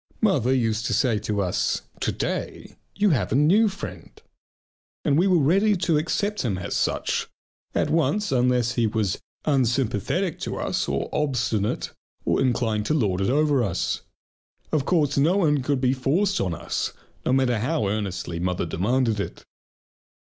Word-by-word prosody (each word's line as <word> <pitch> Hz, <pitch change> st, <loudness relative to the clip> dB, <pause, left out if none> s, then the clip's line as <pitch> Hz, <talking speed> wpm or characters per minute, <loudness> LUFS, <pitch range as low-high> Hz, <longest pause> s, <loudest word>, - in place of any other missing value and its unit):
Mother 145 Hz, -, +2 dB
used 115 Hz, -4 st, +1 dB
to -, -, +1 dB
say 120 Hz, -6 st, +2 dB
to 105 Hz, 0 st, -1 dB
us: 90 Hz, -, -1 dB, 0.2 s
"To -, -, 0 dB
day -, -, -4 dB, 0.2 s
you 205 Hz, -1 st, +3 dB
have 130 Hz, -9 st, 0 dB
a -, -, +2 dB
new 185 Hz, +10 st, +4 dB
friend!" 195 Hz, +1 st, -8 dB, 1.0 s
And 145 Hz, -, +3 dB
we 175 Hz, +6 st, +3 dB
were 185 Hz, -2 st, +4 dB
ready 195 Hz, +8 st, +3 dB
to 170 Hz, -4 st, +1 dB
accept 205 Hz, +6 st, -1 dB
him 105 Hz, -7 st, -1 dB
as 90 Hz, -, -4 dB
such -, -, 0 dB, 0.5 s
at -, -, +1 dB
once 165 Hz, +6 st, +1 dB
unless 125 Hz, -2 st, +2 dB
he 120 Hz, -2 st, +1 dB
was 105 Hz, -3 st, -1 dB, 0.3 s
unsympathetic 130 Hz, -, 0 dB
to -, -, -4 dB
us -, -, -1 dB
or -, -, -1 dB
obstinate 120 Hz, -8 st, -1 dB, 0.3 s
or -, -, +2 dB
inclined 115 Hz, -5 st, 0 dB
to 155 Hz, -, +1 dB
lord 100 Hz, -9 st, +1 dB
it 95 Hz, -, +1 dB
over 145 Hz, 0 st, +3 dB
us. 85 Hz, -, -1 dB, 0.7 s
Of 145 Hz, -3 st, +1 dB
course 150 Hz, -6 st, +2 dB
no 165 Hz, +7 st, +3 dB
one 150 Hz, -7 st, +2 dB
could 140 Hz, +1 st, 0 dB
be 130 Hz, 0 st, +3 dB
forced 170 Hz, +10 st, +1 dB
on 90 Hz, -3 st, -1 dB
us, -, -, -3 dB, 0.3 s
no -, -, 0 dB
matter 130 Hz, -3 st, +2 dB
how 135 Hz, -1 st, 0 dB
earnestly 100 Hz, -4 st, -3 dB
mother 90 Hz, 0 st, -1 dB
demanded 110 Hz, +6 st, 0 dB
it. 100 Hz, -, -5 dB
130 Hz, 165 wpm, -24 LUFS, 110-155 Hz, 1.0 s, new